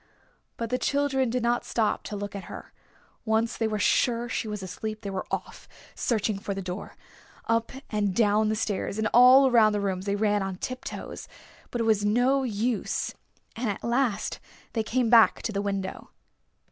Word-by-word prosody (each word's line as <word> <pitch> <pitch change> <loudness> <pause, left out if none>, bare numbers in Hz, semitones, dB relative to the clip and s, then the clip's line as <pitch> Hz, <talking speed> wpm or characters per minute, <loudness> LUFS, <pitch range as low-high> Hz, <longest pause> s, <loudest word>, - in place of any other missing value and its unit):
But 230 -1 -4
the 250 - +1
children 275 -3 +1
did 250 +1 -1
not 240 +1 +1
stop 220 -3 0
to 210 - -5
look 205 0 -5
at 195 -3 -6
her. - - -10 0.5
Once 225 +1 +1
they 225 - 0
were 215 -1 -2
sure 235 +3 +2
she 235 - -3
was 210 -2 -5
asleep 215 +4 -5
they 200 - -5
were 190 -1 -4
off - - -5 0.3
searching 215 -3 -1
for 200 0 -4
the 195 - -4
door. 180 +2 -6 0.5
Up 230 0 0 0.2
and 205 -3 0
down 215 -1 +3
the 215 - +1
stairs 205 -2 -2
and 220 0 +1
all 255 +3 +8
around 225 -4 +5
the 205 - 0
rooms 190 -1 -2
they 200 - +1
ran 205 0 +1
on 195 -1 -3
tiptoes. 255 +7 -6 0.4
But 240 - -2
it - - +2
was 220 -2 +2
no 245 +6 +3
use, 230 -1 -1 0.4
and 230 -1 -2
at 200 - -4
last 235 -2 0 0.3
they 225 - +1
came 235 +1 0
back 230 -2 +6
to - - -2
the 200 -1 -1
window. 195 -2 -4
220 Hz, 185 wpm, -27 LUFS, 205-240 Hz, 0.5 s, all